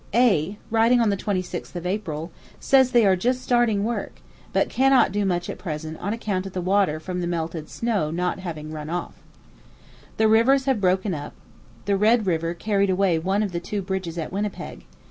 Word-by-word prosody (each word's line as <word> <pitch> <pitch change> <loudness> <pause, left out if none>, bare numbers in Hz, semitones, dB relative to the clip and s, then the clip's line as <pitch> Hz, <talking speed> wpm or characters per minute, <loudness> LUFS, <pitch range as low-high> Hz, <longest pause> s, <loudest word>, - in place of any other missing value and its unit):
A, 205 -6 +3
writing 230 +2 +4
on 225 -3 +3
the - - +1
26th 185 -2 -4
of 175 0 -5
April, 175 -4 -3 0.3
says 265 -2 +4
they 240 -3 +4
are 190 -1 +5
just 250 +7 -1
starting 240 -5 +2
work, 235 +2 -3 0.4
but - - +2
cannot 265 -4 +4
do 205 +1 0
much 175 -2 -1
at - - -6
present 160 -2 -5
on 200 - -3
account 200 -4 -2
of 190 - -10
the 185 - -2
water 185 -3 +1
from 180 +2 -4
the 175 - -2
melted 165 -2 -3
snow 215 -10 -1
not 180 +3 -2
having 155 -4 -6
run 155 -1 -6
off. 175 +1 -5 1.0
The 220 - +4
rivers 250 +5 +4
have 265 -6 +1
broken 185 +1 +1
up. 145 -2 -6 0.5
The 200 0 +1
Red 220 +2 +3
River 165 -1 -1
carried 200 +1 +1
away 185 -3 +2
one 190 +5 0
of 200 - -3
the 170 - -2
two 200 +3 -4
bridges 185 -3 -4
at 160 - -4
Winnipeg. 205 +1 -4
190 Hz, 195 wpm, -24 LUFS, 170-220 Hz, 1.0 s, are